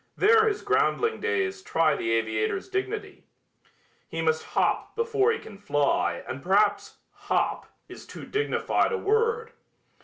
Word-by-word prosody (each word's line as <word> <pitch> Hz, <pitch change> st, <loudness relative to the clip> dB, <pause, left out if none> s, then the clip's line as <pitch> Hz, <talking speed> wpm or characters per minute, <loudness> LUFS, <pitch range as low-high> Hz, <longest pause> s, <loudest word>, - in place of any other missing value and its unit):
There 445 Hz, +1 st, +5 dB
his 420 Hz, -1 st, -1 dB
groundling 450 Hz, 0 st, +1 dB
days 385 Hz, -3 st, -1 dB
try 160 Hz, -, +2 dB
the 115 Hz, -, -3 dB
aviator's 110 Hz, -, -1 dB
dignity. 390 Hz, +2 st, -4 dB, 0.9 s
He 165 Hz, -, -5 dB
must 160 Hz, -1 st, +1 dB
hop -, -, -1 dB
before 460 Hz, -2 st, +2 dB
he 455 Hz, -, -1 dB
can 210 Hz, -, -12 dB
fly 145 Hz, -9 st, 0 dB
and 130 Hz, -, -5 dB
perhaps 205 Hz, +4 st, +1 dB
"hop" -, -, -1 dB, 0.2 s
is -, -, -12 dB
too -, -, -9 dB
dignified 430 Hz, +2 st, 0 dB
a 465 Hz, -, 0 dB
word. 455 Hz, +2 st, 0 dB
385 Hz, 140 wpm, -26 LUFS, -, 0.9 s, There